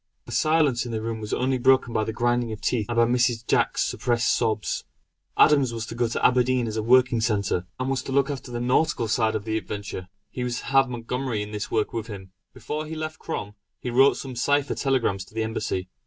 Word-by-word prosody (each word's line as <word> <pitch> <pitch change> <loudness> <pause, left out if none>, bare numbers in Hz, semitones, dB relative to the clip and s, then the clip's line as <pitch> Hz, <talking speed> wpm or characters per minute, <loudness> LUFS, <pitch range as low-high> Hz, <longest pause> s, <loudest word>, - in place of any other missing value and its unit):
The - - -10
silence 155 -6 +2
in 120 - -6
the 110 - -2
room 110 0 -4
was 105 - -6
only 130 0 0
broken 130 -1 +3
by 110 - +1
the 110 - -3
grinding 120 0 0
of 110 - -6
teeth, 110 -5 -1
and 120 - -2
by 115 0 +5
Mrs. 120 -1 +1
Jack's - - +2
suppressed 120 -1 +1
sobs. 110 -3 -1 0.5
Adams 140 -5 +5
was 115 -1 -4
to - - -7
go 120 0 0
to 115 - -1
Aberdeen 125 0 +3
as 110 -1 -4
a 110 - 0
working 125 0 +4
centre, 100 -5 0
and 130 - -1
was 135 -1 0
to - - -7
look 140 +1 +2
after 135 -2 -6
the 120 -1 -4
nautical 125 0 +1
side 110 0 +1
of 105 -1 -3
the 110 0 0
adventure; 100 -3 -6 0.2
he 125 - -4
was 120 -1 -2
to - - -11
have 135 -1 +3
Montgomery 120 -1 -3
in 105 - -9
this 105 -1 -4
work 110 -2 0
with 115 -1 -3
him. 95 -4 -9 0.2
Before 155 +1 -5
he 160 - -6
left 155 0 -5
Crom, 105 -10 -5 0.3
he 125 - -4
wrote 135 +3 +5
some 130 -2 -7
cipher 145 +4 +1
telegrams 125 -8 0
to 110 - -20
the 110 - 0
Embassy. 105 -4 -3
120 Hz, 230 wpm, -25 LUFS, 110-130 Hz, 0.5 s, by